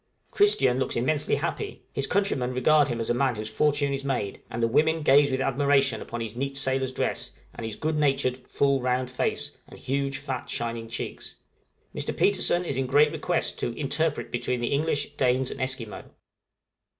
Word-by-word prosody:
Christian 135 - +3
looks - - -1
immensely 145 +5 +1
happy: 160 +2 -4
his 140 - -1
countrymen 135 -11 0
regard 145 +3 +4
him 120 -3 -3
as 115 - -1
a - - +3
man 130 0 +1
whose 110 0 -5
fortune 145 -1 +1
is 135 0 -3
made, 125 -8 -2
and 115 +1 -3
the - - +4
women 155 +6 +2
gaze 145 0 +6
with 130 -1 -1
admiration 135 -3 +2
upon 120 0 -5
his 115 -1 -5
neat 135 +2 -3
sailor's 130 -1 0
dress, - - -2 0.2
and 115 - -5
his 110 - -6
good 155 0 -1
natured, 135 -3 +2
full, 135 +1 0
round 125 0 0
face, 125 - -1 0.2
and - - -13
huge, 140 +1 -2
fat, 135 -2 -5
shining 115 -1 -3
cheeks; 115 0 -6 0.6
Mr. - - -4
Petersen 185 -3 +3
is 140 - -2
in 135 -1 0
great 145 +3 +5
request - - -1
to - - -3
interpret - - -1
between 125 -1 -1
the 120 +3 -1
English, 145 0 0
Danes, 130 0 +2
and 135 - -6
Esquimaux. 130 -5 -4
135 Hz, 185 wpm, -26 LUFS, 125-145 Hz, 0.6 s, gaze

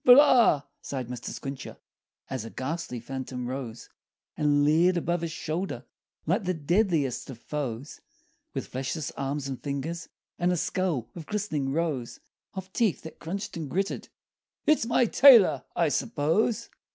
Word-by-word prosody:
"But 250 0 +9
ah!" 245 - +6 0.2
sighed 130 -4 -4
Mr. 125 -1 -5
Squincher, 135 -1 -6 0.5
As 130 -4 -4
a 115 - -7
ghastly 135 -1 -4
phantom 130 +1 -5
'rose 125 -3 -5 0.5
And 145 -1 +3
leered 170 +4 +4
above 175 0 0
his 165 -1 -3
shoulder 160 -5 -3 0.4
Like 185 +6 +1
the 185 0 0
deadliest 160 - +1
of 130 - -7
foes, 135 0 -5 0.5
With - - -2
fleshless 135 +4 -3
arms 140 +1 -3
and 135 -2 -5
fingers, 150 +4 -4 0.3
And 175 0 +2
a 180 - +1
skull, 170 - -1
with 165 -3 -9
glistening 155 -10 -1
rows 150 -6 -2 0.4
Of 190 0 -7
teeth 225 -7 +1
that 160 - -10
crunched 200 +5 -5
and 160 -4 -4
gritted, 195 +5 -2 0.6
"It's 305 -7 +3
my 245 +1 +4
tailor, 240 -3 +7
I - - +3
suppose!" 215 +3 0
155 Hz, 150 wpm, -28 LUFS, 135-185 Hz, 0.6 s, But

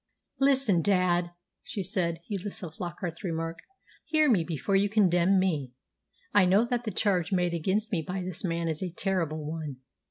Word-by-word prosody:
"Listen, 270 -10 +3
dad," 180 -2 +2 0.3
she 260 -9 -4
said, 170 -4 -1
heedless 200 -1 -5
of 165 -3 -6
Flockart's 175 +1 -5
remark. 165 -2 -3 0.5
"Hear 310 -3 +3
me 190 -7 +3
before 165 +3 -1
you 200 +1 +3
condemn 190 -3 +4
me. 155 -9 0 0.6
I 205 -3 +6
know 200 +5 +4
that 245 0 -2
the - - -1
charge 185 -5 +1
made 180 -2 +1
against 195 +7 0
me 175 -5 +1
by 180 +3 -4
this 180 +1 -4
man 170 -2 -1
is 160 -2 -1
a 185 - -2
terrible 170 -4 -2
one. 155 -2 -4
180 Hz, 170 wpm, -28 LUFS, 165-205 Hz, 0.6 s, I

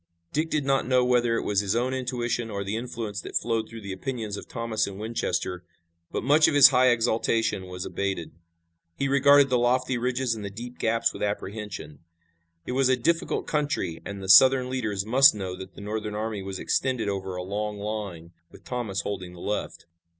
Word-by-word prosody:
Dick 155 +2 0
did 150 -3 -1
not 135 -2 +1
know 125 -1 +3
whether 120 -2 +2
it - - -1
was 100 -1 +1
his 100 +1 0
own 125 +2 0
intuition 120 -2 -2
or 100 -2 -3
the 100 +2 -3
influence 115 -4 -4
that - - -9
flowed 115 -2 -1
from 115 -1 -9
the 100 - -6
opinions 110 0 -4
of - - -9
Thomas 115 -2 -2
and 100 0 -8
Winchester, 90 -5 -2 0.5
but - - -3
much 150 +5 +5
of 145 - +1
his 135 -2 +10
high 130 -1 +4
exultation 115 -4 +1
was 90 0 -6
abated. 95 -4 -3 0.7
He 140 - 0
regarded 140 0 +5
the 125 - +3
lofty 125 +1 +1
ridges 125 0 0
and 110 -2 -6
the 100 - -4
deep 120 +5 -9
gaps 115 0 +1
with - - -9
apprehension. 100 -6 -4 0.7
It - - -4
was 130 +1 +2
a 130 - +3
difficult 165 +7 0
country 145 - -2
and 100 -1 -7
the - - -6
Southern 130 +5 +7
leaders 110 -6 -2
must 135 +3 +6
know 95 -3 -4
that 95 0 -10
the - - -10
Northern 105 0 -4
army 110 -1 -3
was 95 0 -5
extended 125 -1 0
over 95 -2 -3
a 90 - -4
long 105 +2 -3
line, 100 -5 -5 0.2
with - - -16
Thomas 110 -6 -3
holding 95 -3 -5
the 90 - -12
left. 105 +4 -4
115 Hz, 200 wpm, -26 LUFS, 100-125 Hz, 0.7 s, his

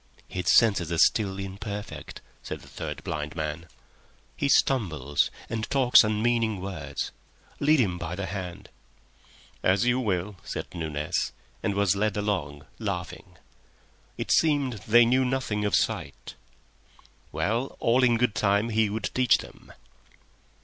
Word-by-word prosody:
"His 90 -1 -5
senses 100 -8 +4
are 85 - 0
still 95 +2 +3
imperfect," 100 +2 -6 0.2
said - - -6
the - - -15
third - - -6
blind 75 0 -4
man. 80 +1 -4 0.7
"He 140 - -1
stumbles, 75 - +2 0.2
and 110 0 -3
talks 130 -4 +6
unmeaning 110 0 +1
words. 95 -4 -5 0.5
Lead 150 +1 +4
him 90 -7 +1
by 85 +1 -4
the 95 +1 -3
hand." 95 -2 -6 0.9
"As 95 +5 +2
you 125 +1 +2
will," 100 -4 -2
said - - -4
Nunez, 75 -3 -2 0.3
and 100 -3 -1
was 100 -1 +2
led 105 0 0
along 80 -9 -2
laughing. - - -5 0.8
It - - -3
seemed 140 -8 +2
they 120 +2 +7
knew 130 +3 +3
nothing 125 -5 -1
of 105 - +2
sight. - - -2 1.0
Well, 115 +6 -1
all 125 +3 +3
in 120 -2 +4
good 125 -2 +1
time 100 +3 +1
he 110 -1 +2
would 110 +2 -3
teach 125 -3 +4
them. - - -12
105 Hz, 135 wpm, -27 LUFS, 90-120 Hz, 1.0 s, they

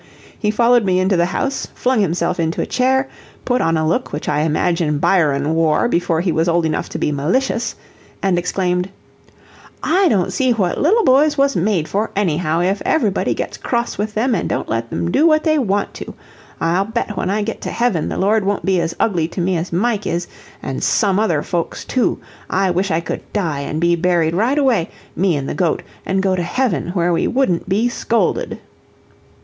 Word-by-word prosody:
He 210 - 0
followed 235 +2 +3
me 185 -2 +2
into 190 +1 +2
the 175 0 +2
house, 275 +9 -2
flung 250 -3 +1
himself 175 -1 0
into 165 0 -1
a - - 0
chair, 265 +1 +1 0.4
put 250 0 +1
on 165 0 +1
a 155 0 0
look 165 - -1
which 150 - -5
I 150 - +1
imagine 155 0 +1
Byron 150 -3 +2
wore 160 +6 +2
before 170 -6 0
he 175 -1 0
was 160 +2 +1
old 170 0 +2
enough 160 - -2
to - - -5
be - - 0
malicious, 230 - -1 0.4
and 185 -3 +1
exclaimed: 180 0 -1 0.9
"I 370 +4 +3
don't 190 - +1
see 255 -2 +2
what 190 -6 -1
little 425 +10 +3
boys 290 +2 +4
was 275 -2 +2
made 175 -3 +1
for 210 +3 -1
anyhow; 170 -4 0
if 190 +3 0
ev'rybody 220 -11 +1
gets - - -4
cross 235 -3 -2
with 210 +1 -2
them, 240 +3 +1
an' 185 - -1
don't - - -2
let 115 +1 -3
'em 170 - -2
do 300 - +4
what 310 -1 +3
they 310 -2 +2
want 205 -5 -1
to. - - -8 0.4
I'll 175 +4 +1
bet 225 -1 -3
when 185 - -2
I 210 +2 0
get 225 +1 -5
to - - -4
heaven, 235 -9 0
the - - -4
Lord 210 +2 +2
won't 200 +1 -1
be 190 -3 +2
as 165 0 -3
ugly 175 -7 +1
to 175 - -7
me 180 +1 +1
as 170 +2 -3
Mike 210 +3 0
is, 175 +1 -1 0.4
an' - - -4
some 200 -3 +2
other 170 -9 +1
folks, 170 -3 -3
too. 255 -3 0 0.3
I 190 0 +1
wish 185 +3 0
I 160 0 +1
could - - -4
die 165 -9 -1
and 150 +2 -3
be 170 +1 +3
buried 170 -2 +1
right 230 +10 +1
away, 245 - +2 0.3
me 180 -2 +2
an' 140 - -3
the - - -3
goat 175 -4 0 0.2
an' 190 0 +1
go 190 -1 +1
to 180 - -1
heaven, 195 +3 -1
where 175 -1 +2
we - - +1
wouldn't 190 -10 0
be 210 +5 +2
scolded." 235 -1 -1
190 Hz, 205 wpm, -18 LUFS, 170-230 Hz, 0.9 s, boys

